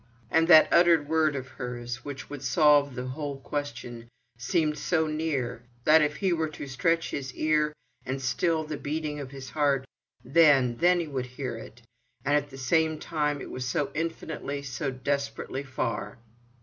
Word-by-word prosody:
And 165 0 +4
that 160 -3 +9
unuttered 170 -4 +5
word 155 -1 +2
of 130 -1 -4
hers, 120 -1 -6
which 140 -2 -7
would 145 -2 -7
solve 145 0 +4
the 125 0 -4
whole 140 0 -5
question, 130 -5 -5 0.3
seemed 150 +6 0
so 160 -3 +1
near, 155 -7 -2 0.2
that 155 +3 +6
if 150 0 +1
he 190 0 +1
were 160 -2 0
to 150 - -7
stretch 165 +6 0
his 135 -2 -5
ear 155 -1 +2 0.3
and 135 +1 -3
still 155 +6 0
the 150 -1 -5
beating 150 0 -3
of 140 -2 -6
his 135 -1 -9
heart, 140 -3 +1 0.4
then, 135 -4 +5
then 175 +3 +4
he 165 - -4
would 130 -3 -3
hear 125 0 -5
it—and 120 +5 -6
at 145 0 0
the 135 - -11
same 155 +4 +1
time 150 -2 -1
it - - -8
was 125 -1 -4
so 145 +2 -1
infinitely, 155 -3 -4
so 135 +1 -3
desperately 140 0 -3
far. 130 -4 -3
145 Hz, 170 wpm, -27 LUFS, 130-155 Hz, 0.4 s, that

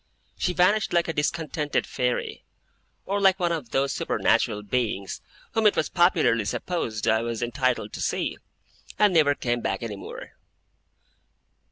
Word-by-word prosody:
She 180 - -1
vanished 190 +4 +2
like 170 -1 +2
a 165 - -2
discontented 150 0 -1
fairy; 125 -1 -2 0.6
or 200 +1 -1
like 190 -1 +4
one 175 -1 +1
of 155 -8 -3
those 135 +3 0
supernatural 110 -1 +1
beings, 105 -3 -2 0.3
whom 220 -1 +3
it 210 - +3
was - - 0
popularly 165 - +3
supposed 115 - -3
I 110 0 +3
was 115 0 -3
entitled 130 +1 -1
to - - -5
see; - - -2 0.6
and 210 -3 +4
never 150 -4 +4
came 120 -2 -1
back 95 0 -2
any 110 -3 -4
more. - - -9
140 Hz, 150 wpm, -25 LUFS, 115-175 Hz, 0.6 s, like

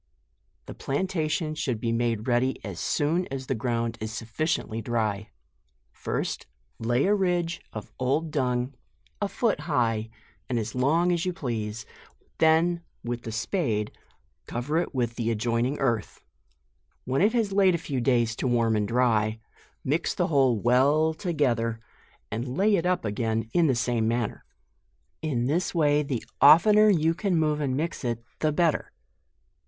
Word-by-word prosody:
The - - -8
plantation 155 +1 -1
should 135 -7 -2
be 115 +1 -1
made 115 -1 -1
ready 125 +2 +1
as 100 -4 -6
soon 165 +5 0
as 135 -1 -5
the 135 - -1
ground 115 -1 -2
is 110 0 -4
sufficiently 115 +1 -2
dry. 110 -3 -2 0.6
First - - -4 0.3
lay 120 +4 +1
a 200 - +3
ridge 175 -4 0
of 105 - -8
old 145 +5 0
dun^ 125 -2 -1 0.5
a 205 - +1
foot 220 -3 0
high, 115 -8 0 0.4
and 125 - 0
as 110 -1 -3
long 160 +8 +2
as 170 -1 0
you 180 - 0
please, 110 -7 -4 0.5
then 165 +2 +3 0.2
with 120 0 -3
the 115 - -6
spade 115 - -1 0.6
cover 140 +7 -1
it 170 - -3
with 120 -2 -1
the 115 -2 -1
adjoining 115 +4 0
earth; 115 - -2 0.8
when 130 +4 0
it 210 +4 +4
has 225 -4 +1
laid 195 -2 +4
a - - +1
few 140 -5 -3
days 120 -3 +2
to - - -1
warm 115 -2 +2
and 105 -1 0
dry, 115 -2 +1 0.4
mix 155 +5 0
the 175 - 0
whole 135 -7 +3
well 140 +7 +3
together, 125 - 0 0.5
and 125 +4 -4
lay 205 +2 +4
it 175 -1 0
up 180 -8 0
again 110 +1 -1
in 170 -2 +4
the 130 - +2
same 120 -2 0
manner. 115 -1 -2 0.8
In 135 -7 -1
this 165 +7 0
way 150 -2 +3
the 135 -5 -3 0.2
oftener 210 +9 +7
you 165 -4 +3
can 185 0 0
move 150 -1 +1
and 135 -2 -1
mix 165 +1 -3
it, 120 -2 -2 0.2
the 155 - +1
better. 160 +1 +1
130 Hz, 160 wpm, -26 LUFS, 115-160 Hz, 0.8 s, oftener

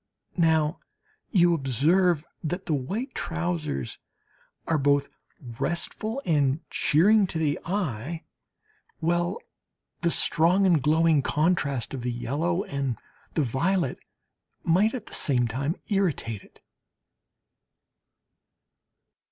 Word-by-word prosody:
Now 160 -1 +2 0.5
you 175 -4 +4
observe 160 - +2 0.2
that 180 +4 -3
the 160 - -1
white 200 - -3
trousers 165 - -3 0.7
are 160 -2 +2
both 140 0 +2 0.5
restful 215 +9 -1
and 145 -1 +1
cheering 200 +6 +4
to 170 - -5
the 155 -2 0
eye 165 - -3 0.7
while 175 +4 0 0.6
the 170 - +2
strong 170 +4 +3
and 170 -6 +4
glowing 155 +1 +3
contrast 145 -5 0
of 135 - -4
the 125 +1 -2
yellow 145 +10 -1
and 135 - -3 0.4
the 155 - +2
violet 140 +5 0 0.6
might 200 +8 +3
at 240 - -6
the - - -12
same 125 -4 +2
time 140 +8 -2
irritate 160 - 0
it. - - -22
160 Hz, 105 wpm, -26 LUFS, 140-180 Hz, 0.7 s, you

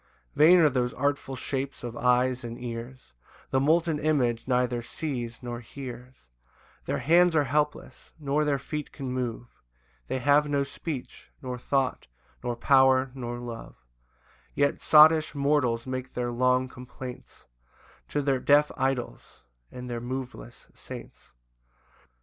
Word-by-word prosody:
3 155 - +6
[Vain 180 +2 +8
are 155 - +6
those 125 -2 -1
artful 140 0 -1
shapes 135 +1 -4
of 120 -1 -5
eyes 125 +1 +2
and 120 0 -7
ears; 120 - -7 0.4
The 130 - +3
molten 160 +2 +2
image 130 -7 +1
neither 125 -1 +1
sees 120 -3 -5
nor 120 -1 -5
hears: 125 0 -9 0.7
Their - - -1
hands 175 +2 +4
are 150 - +4
helpless, 150 +2 -2
nor 145 0 0
their 145 -2 +1
feet 150 +2 -5
can 135 -3 -6
move, 120 -2 -5 0.5
They - - -2
have 145 +3 +3
no 140 -1 +1
speech, 140 -1 -7
nor 125 -1 -5
thought, 135 - -1 0.4
nor 120 -1 -2
power, 130 +1 +4
nor 120 -2 -5
love; 120 -1 -8 0.8
Yet 140 0 +1
sottish 155 0 +6
mortals 140 -5 +1
make 130 0 -5
their 120 -1 -1
long 125 +1 +2
complaints 125 0 -10 0.6
To 145 - -1
their 135 -2 +1
deaf 145 +3 +4
idols, 130 - -3 0.3
and 125 0 -8
their 120 -1 -4
moveless 120 - -7
saints. - - -11
130 Hz, 140 wpm, -27 LUFS, 125-145 Hz, 0.8 s, Vain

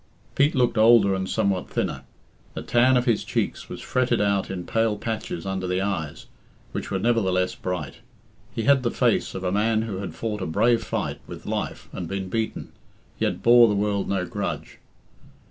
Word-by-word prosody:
Pete 145 +2 +3
looked 125 -3 +2
older 110 -3 +6
and 95 0 -2
somewhat 95 -2 0
thinner; - - -2 0.5
the - - -5
tan 125 +2 +4
of 125 - +1
his 115 -5 +2
cheeks - - -2
was - - -7
fretted 125 -2 +1
out 100 -1 +1
in 90 -2 -5
pale 115 -2 +1
patches 105 -6 -4
under 95 -1 -2
the 90 +1 0
eyes, 95 -7 -3 0.5
which - - -5
were 95 - -1
nevertheless 95 -4 +1
bright. 90 -1 -4 0.5
He 115 - -3
had 140 0 +4
the 120 - 0
face - - +1
of 95 - -5
a 90 - 0
man 110 +2 +2
who 105 -4 -4
had 100 0 -6
fought 105 -2 -3
a 95 - -2
brave 115 +9 +2
fight - - -3
with - - -9
life - - -4
and 90 - -5
been 95 +1 -4
beaten, 110 +2 -3 0.5
yet - - -1
bore 120 0 +7
the 105 - +1
world 100 -1 0
no 95 -2 0
grudge. - - -5
105 Hz, 185 wpm, -24 LUFS, 95-115 Hz, 0.5 s, bore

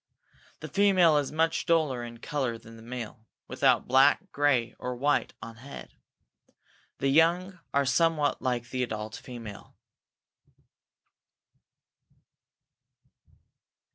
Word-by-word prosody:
The - - -6
female 185 -6 +4
is 145 -2 -1
much 160 +1 0
duller 155 -7 +1
in 120 0 -8
color 125 -2 -3
than 115 0 -14
the 115 - -13
male, 115 -1 -8 0.2
without - - +2
black, 135 +9 +4
gray, 140 -5 +1
or 125 0 -4
white 145 +4 0
on 115 0 -9
head. 135 +4 -11 1.0
The 135 - 0
young 175 +5 +2
are 140 0 +2
somewhat 155 0 +1
like 125 -1 -2
the 130 - -2
adult 110 -3 -4
female. 115 -5 -10
135 Hz, 110 wpm, -28 LUFS, 120-160 Hz, 1.0 s, female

